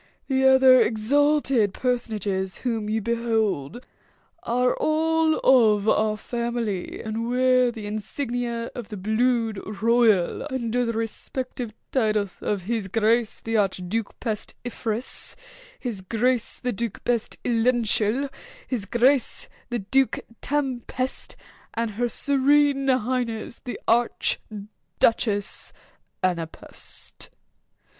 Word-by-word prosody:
The 265 -1 +2
other 265 -1 +7
exalted 260 -2 +2
personages 210 -6 -1
whom 225 -3 -1
you 220 +1 0
behold 225 - -1 0.6
are 250 +2 +1
all 320 0 +2
of 220 -5 +5
our 215 0 +2
family, 235 -4 -3
and 225 +1 -3
wear 255 0 +4
the 220 -3 -8
insignia 235 +2 -3
of 240 -3 -7
the 210 - -6
blood 225 +1 +1 0.2
royal 230 -2 +3
under 245 -2 -1
the 230 - -1
respective 230 +2 -4 0.2
titles 215 -6 0
of 200 -3 -1
'His 220 0 -2
Grace 225 +2 +1
the 225 0 -1
Arch 195 -3 +1
Duke 225 +3 -3
Pest 220 -3 -3
Iferous'—'His 245 - -5
Grace 235 +5 0
the 250 -1 -2
Duke 230 0 -4
Pest 235 -2 0
Ilential'—'His 240 - 0
Grace 245 +5 +2 0.2
the 240 - -1
Duke 260 +6 +1 0.2
Tem 270 -3 0
Pest'—and 235 -2 -4
'Her 240 +4 -1
Serene 280 +1 +3
Highness 245 -2 -1
the 245 - -6
Arch 235 +1 +2 0.6
Duchess 210 -3 +1 0.5
Ana 175 -3 +1
Pest. - - -6
235 Hz, 105 wpm, -25 LUFS, 215-255 Hz, 0.6 s, other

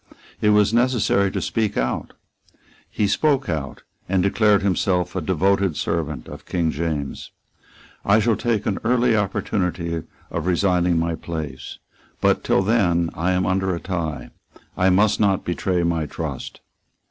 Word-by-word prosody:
It 105 - +3
was 105 0 +4
necessary 120 -5 +2
to - - -3
speak 110 -3 -1
out. 65 +1 -2 0.8
He 105 - 0
spoke 140 +5 +1
out, 75 -5 -4 0.3
and 95 -1 +2
declared 105 0 +3
himself 90 -2 0
a 95 - -1
devoted 95 +1 +1
servant 75 -6 -2
of - - -11
King 85 -3 0
James. 75 -2 -3 0.7
"I 100 +1 +4
shall 110 +1 +2
take 115 -2 -1
an 100 - -1
early 120 0 +3
opportunity 90 -4 -1 0.3
of 85 +1 -3
resigning 90 -1 +2
my 85 0 0
place. 75 -5 -6 0.4
But, - - +2
till 95 - +2
then, 90 -6 +2
I 90 +3 0
am 90 0 +1
under 95 0 0
a - - -5
tie. 80 -8 -4 0.4
I 95 +1 +3
must 100 +3 +3
not 100 -3 +2
betray 90 0 0
my 85 -2 0
trust." - - -6
95 Hz, 145 wpm, -22 LUFS, 85-105 Hz, 0.8 s, was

